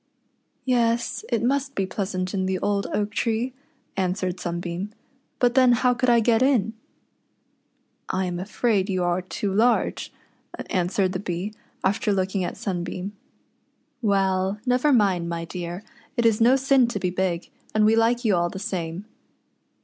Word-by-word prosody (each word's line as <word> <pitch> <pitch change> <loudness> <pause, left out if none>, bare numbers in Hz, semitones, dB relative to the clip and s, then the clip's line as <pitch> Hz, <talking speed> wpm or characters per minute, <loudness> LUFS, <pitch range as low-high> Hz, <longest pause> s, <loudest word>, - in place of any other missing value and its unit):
"Yes, 235 -2 +1
it 230 -1 0
must 275 +2 0
be 195 - 0
pleasant 185 -1 -3
in 190 -1 0
the 190 0 0
old 200 +1 0
oak 205 0 -1
tree," 230 +3 -1 0.4
answered 185 -1 -1
Sunbeam; 175 +3 -4 0.5
"but 245 -1 +3
then 255 -1 +6
how 250 +1 +3
could 245 +1 +1
I 235 -1 +6
get 225 +1 +3
in 240 -6 +3 0.4
?" - - -45
" - - -45 0.3
I 190 0 0
am 175 -1 -3
afraid 205 +1 0
you 185 -2 0
are 175 +1 +1
too 190 +2 -3
large," 230 +5 +2 0.6
answered 185 +1 +1
the 185 - -3
Bee, 185 +2 -4 0.3
after 205 +2 +1
looking 190 0 0
at - - -4
Sunbeam. 185 +1 -4 0.4
" 250 - -45
Well, 190 0 +1
never 255 +4 +3
mind, 195 -8 +2
my 170 0 -3
dear, 175 +2 -6 0.3
it 235 - +2
is 225 -1 +3
no 245 +3 +6
sin 270 -2 +4
to 235 -4 -3
be 180 -1 -1
big, 180 -2 -2 0.2
and 215 0 +4
we 220 +1 +5
like 235 +2 +2
you 210 -4 +4
all 175 0 +1
the 190 - -7
same." 180 -1 -4
200 Hz, 165 wpm, -24 LUFS, 185-235 Hz, 0.6 s, then